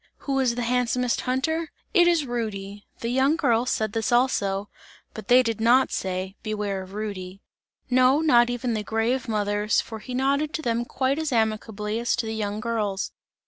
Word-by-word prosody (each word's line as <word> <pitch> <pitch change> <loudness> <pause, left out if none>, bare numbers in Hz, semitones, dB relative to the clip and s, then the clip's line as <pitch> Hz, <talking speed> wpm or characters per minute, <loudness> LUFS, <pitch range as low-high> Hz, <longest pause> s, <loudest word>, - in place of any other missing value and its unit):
Who 275 -1 0
is 250 -3 +2
the 245 - -2
handsomest 250 0 0
hunter? 320 +5 0 0.2
"It 350 -4 +6
is 335 -4 +3
Rudy." 205 -4 -5
The 230 - -2
young 265 +5 +3
girls 240 -6 +1
said 215 -1 -1
this 225 0 -1
also, 205 -5 +1 0.5
but - - -9
they 255 +1 +6
did 225 -2 -2
not 245 +4 +4
say: 190 +1 -3
"Beware 210 -3 -3
of 190 +1 -11
Rudy!" 195 -2 -6 0.4
No, 255 +2 +4
not 240 -7 +4
even 245 0 -2
the 215 - -1
grave 225 +4 -1
mothers, 210 -1 +1
for 220 -1 -5
he 250 +3 -7
nodded 280 +4 +1
to 315 - -4
them 235 0 0
quite 265 +4 -1
as 315 -2 -2
amicably 220 -1 -1
as 235 0 +1
to 240 - -2
the 220 - -3
young 210 -1 -3
girls. 210 -3 -2
235 Hz, 185 wpm, -25 LUFS, 210-255 Hz, 0.5 s, It